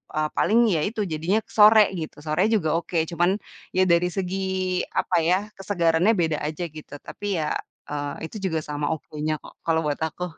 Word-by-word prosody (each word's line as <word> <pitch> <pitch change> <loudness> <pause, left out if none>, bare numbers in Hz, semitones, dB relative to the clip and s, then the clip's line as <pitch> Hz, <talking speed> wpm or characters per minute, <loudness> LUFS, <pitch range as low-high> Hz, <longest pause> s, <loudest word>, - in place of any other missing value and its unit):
eee, 155 0 +1
paling 225 +3 +3 0.2
ya - - +1
itu 215 +1 -3
jadinya 165 +7 0
ke - - -22
sore 215 0 +8 0.2
gitu, 155 - -6
sore 155 +2 0
juga 165 -8 +2
oke, 170 0 -4
cuman, 175 +3 +2 0.4
ya 185 - +5
dari 170 0 +4
segi, 190 0 -2 0.5
apa - - 0
ya, 175 +3 +4 0.2
kesegarannya 180 -1 +2
beda 160 -2 +1
aja 155 +3 -4
gitu, 155 -1 -12
tapi 205 -2 -4
ya 150 -1 -1 0.3
eee, 145 -1 -4
itu - - -15 0.2
juga 160 - 0
sama 145 0 -2
okenya 155 0 -4
kok - - -13
kalau 165 -1 +2
buat 145 - -2
aku. 160 +3 -3
165 Hz, 185 wpm, -24 LUFS, 155-190 Hz, 0.5 s, sore